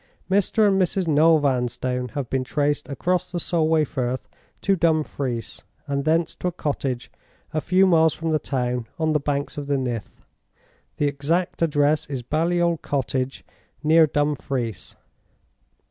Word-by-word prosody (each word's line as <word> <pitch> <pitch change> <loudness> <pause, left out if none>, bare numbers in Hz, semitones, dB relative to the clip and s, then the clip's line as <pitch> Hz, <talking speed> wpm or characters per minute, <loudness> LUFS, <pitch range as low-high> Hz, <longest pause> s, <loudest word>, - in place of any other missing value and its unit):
"Mr. 205 +2 +3
and 195 -1 +3
Mrs. 185 0 0
Noel 160 +1 +5
Vanstone 125 -2 -1
have 140 -4 -2
been 130 +1 -1
traced 145 +2 -1
across 180 +6 -1
the 175 - -2
Solway 160 -2 +2
Firth 130 -2 -3 0.3
to 195 - +2
Dumfries, 150 - -1 0.2
and 140 0 -2
thence 165 +1 +2
to - - -2
a - - 0
cottage 140 -6 -3 0.4
a 155 - 0
few 185 +4 +4
miles 160 -4 +4
from 165 0 -2
the 155 - +2
town, 125 -4 -2
on 160 -1 +1
the 150 - +3
banks 145 0 -2
of 145 - -6
the 140 -1 +1
Nith. 120 -6 -5 0.7
The 145 - +1
exact 150 +6 -1
address 150 -1 +2
is 135 -4 -4
Baliol 170 +4 +1
Cottage, 135 -3 -2 0.4
near 160 +1 +6
Dumfries. 135 - -2
150 Hz, 145 wpm, -23 LUFS, 135-165 Hz, 0.7 s, near